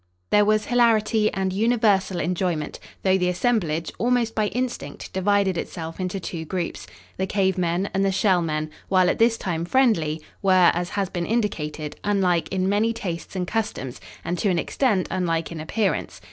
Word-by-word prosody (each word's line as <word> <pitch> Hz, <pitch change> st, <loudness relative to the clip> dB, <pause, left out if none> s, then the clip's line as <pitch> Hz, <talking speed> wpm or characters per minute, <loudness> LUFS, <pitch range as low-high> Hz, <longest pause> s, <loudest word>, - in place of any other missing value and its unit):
There 210 Hz, 0 st, +5 dB
was 215 Hz, 0 st, +2 dB
hilarity 225 Hz, -3 st, +3 dB
and 190 Hz, -1 st, -1 dB
universal 205 Hz, -4 st, +2 dB
enjoyment, 170 Hz, -2 st, -2 dB, 0.2 s
though 190 Hz, 0 st, +3 dB
the 180 Hz, 0 st, +1 dB
assemblage, 175 Hz, -6 st, 0 dB
almost 240 Hz, -1 st, +1 dB
by 215 Hz, -1 st, +1 dB
instinct, 250 Hz, +2 st, -4 dB
divided 190 Hz, -1 st, +2 dB
itself 165 Hz, 0 st, -6 dB
into 185 Hz, +1 st, -2 dB
two 170 Hz, -2 st, -5 dB
groups. 175 Hz, +1 st, -4 dB, 0.3 s
The 190 Hz, -, -1 dB
cave 190 Hz, -2 st, +1 dB
men 175 Hz, +2 st, 0 dB
and 195 Hz, -, +1 dB
the 195 Hz, -, +2 dB
Shell 190 Hz, -2 st, +3 dB
men, 155 Hz, -1 st, -2 dB, 0.2 s
while 185 Hz, -1 st, +4 dB
at -, -, -4 dB
this 230 Hz, 0 st, +4 dB
time 170 Hz, -5 st, -2 dB
friendly, 170 Hz, -, +2 dB, 0.2 s
were, 185 Hz, -3 st, +5 dB
as 175 Hz, 0 st, -2 dB
has 200 Hz, -2 st, -1 dB
been 175 Hz, -2 st, -3 dB
indicated, 155 Hz, -10 st, -2 dB
unlike 185 Hz, -4 st, +1 dB
in 190 Hz, -1 st, 0 dB
many 210 Hz, +3 st, +2 dB
tastes 185 Hz, -6 st, -5 dB
and 180 Hz, -1 st, -1 dB
customs 210 Hz, -, -3 dB, 0.2 s
and 175 Hz, +1 st, -2 dB
to 205 Hz, -, +1 dB
an 180 Hz, -, +1 dB
extent 200 Hz, -, +1 dB
unlike 165 Hz, -3 st, -1 dB
in 165 Hz, -, -6 dB
appearance. 195 Hz, +6 st, -1 dB
190 Hz, 175 wpm, -24 LUFS, 170-215 Hz, 0.3 s, There